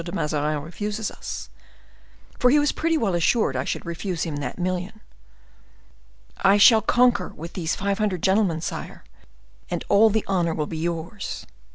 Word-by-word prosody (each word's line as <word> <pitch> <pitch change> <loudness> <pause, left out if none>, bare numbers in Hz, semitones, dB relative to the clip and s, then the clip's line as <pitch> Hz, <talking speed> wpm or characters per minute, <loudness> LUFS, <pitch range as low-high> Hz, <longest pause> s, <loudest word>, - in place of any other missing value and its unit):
de 170 - -6
Mazarin 150 -4 -1
refuses 210 +6 -4
us,'—for 250 - -6
he 285 - +5
was 295 0 +3
pretty 330 0 0
well 215 - 0
assured 175 +7 +2
I - - 0
should - - -3
refuse 170 0 -3
him 155 -3 -3
that 145 - -5
million.—'I 65 - -4
shall 220 +2 +7
conquer 245 -6 +3
with 165 +2 -9
these 170 -2 -2
five 200 +1 -1
hundred 200 -5 -1
gentlemen, 190 -4 +2
sire, - - -6 0.7
and - - -3
all 210 +2 +6
the 220 0 0
honor 175 -4 0
will 150 - -1
be 160 +1 -6
yours. 170 +4 -4
180 Hz, 155 wpm, -24 LUFS, 155-210 Hz, 0.7 s, shall